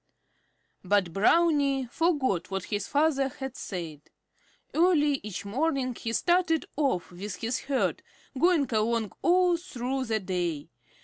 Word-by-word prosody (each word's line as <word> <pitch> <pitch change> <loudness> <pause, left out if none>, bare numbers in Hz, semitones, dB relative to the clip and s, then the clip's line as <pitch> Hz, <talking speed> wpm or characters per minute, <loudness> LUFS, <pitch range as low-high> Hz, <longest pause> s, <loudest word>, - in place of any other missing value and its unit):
But 185 -3 +1
Brownie 280 - +3
forgot 285 - 0
what 195 -1 -3
his 205 0 -3
father 285 -2 +2
had 265 -1 -7
said. 165 -6 -6 0.7
Early 300 -5 +3
each 200 -1 -6
morning 260 +3 0
he 230 0 -5
started 345 +4 +2
off 270 - 0
with 185 +2 -6
his 230 +6 -2
herd, 270 -1 -1 0.3
going 320 0 +3
along 220 -1 +1
all 355 0 +4
through 265 -5 -3
the 220 -2 0
day. 175 -6 -3
260 Hz, 125 wpm, -28 LUFS, 200-310 Hz, 0.7 s, all